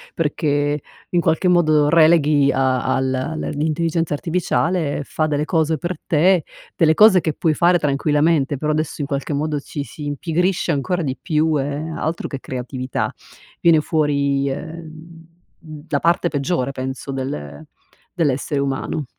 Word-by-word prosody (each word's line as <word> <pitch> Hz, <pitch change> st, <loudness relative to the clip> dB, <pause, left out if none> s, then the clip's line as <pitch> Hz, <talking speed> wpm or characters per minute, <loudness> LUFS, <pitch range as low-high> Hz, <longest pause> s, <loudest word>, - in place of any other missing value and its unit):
perché 145 Hz, -2 st, 0 dB, 0.3 s
in 175 Hz, -1 st, +1 dB
qualche 160 Hz, +3 st, +1 dB
modo 155 Hz, -4 st, +4 dB
releghi 155 Hz, -3 st, +4 dB
a 130 Hz, -1 st, +1 dB
al 130 Hz, +3 st, -1 dB, 0.2 s
l'intelligenza 160 Hz, +1 st, -1 dB
artificiale 165 Hz, -1 st, -1 dB
fa 155 Hz, +2 st, -1 dB
delle 150 Hz, 0 st, -1 dB
cose 160 Hz, -1 st, +1 dB
per 175 Hz, +2 st, -4 dB
te, 175 Hz, +2 st, +3 dB, 0.3 s
delle 160 Hz, -1 st, +3 dB
cose 205 Hz, -3 st, +6 dB
che 155 Hz, -, -1 dB
puoi 160 Hz, -2 st, +1 dB
fare 175 Hz, +3 st, +4 dB
tranquillamente, 145 Hz, 0 st, +1 dB
però 155 Hz, +3 st, -1 dB
adesso 155 Hz, 0 st, -2 dB
in 140 Hz, -, -2 dB
qualche 140 Hz, +1 st, -3 dB
modo, 150 Hz, 0 st, -1 dB
ci 140 Hz, +1 st, -6 dB
si 150 Hz, +1 st, -9 dB
impigrisce 170 Hz, +5 st, -1 dB
ancora 175 Hz, +5 st, -1 dB
di 130 Hz, -3 st, -2 dB
più 155 Hz, -1 st, +1 dB
e 135 Hz, -, -1 dB, 0.3 s
altro 160 Hz, +2 st, -3 dB
che 135 Hz, -, -6 dB
creatività, 130 Hz, 0 st, -4 dB, 0.5 s
viene 165 Hz, -2 st, +5 dB
fuori, 140 Hz, -3 st, 0 dB
ehm, 165 Hz, +2 st, -8 dB, 0.6 s
la 145 Hz, -, +1 dB
parte 170 Hz, +1 st, +2 dB
peggiore 140 Hz, -2 st, -1 dB
penso 130 Hz, +1 st, -5 dB
del 75 Hz, -, -5 dB, 0.5 s
dell'essere 145 Hz, -2 st, 0 dB
umano. 140 Hz, +2 st, -2 dB
150 Hz, 140 wpm, -20 LUFS, 140-165 Hz, 0.6 s, cose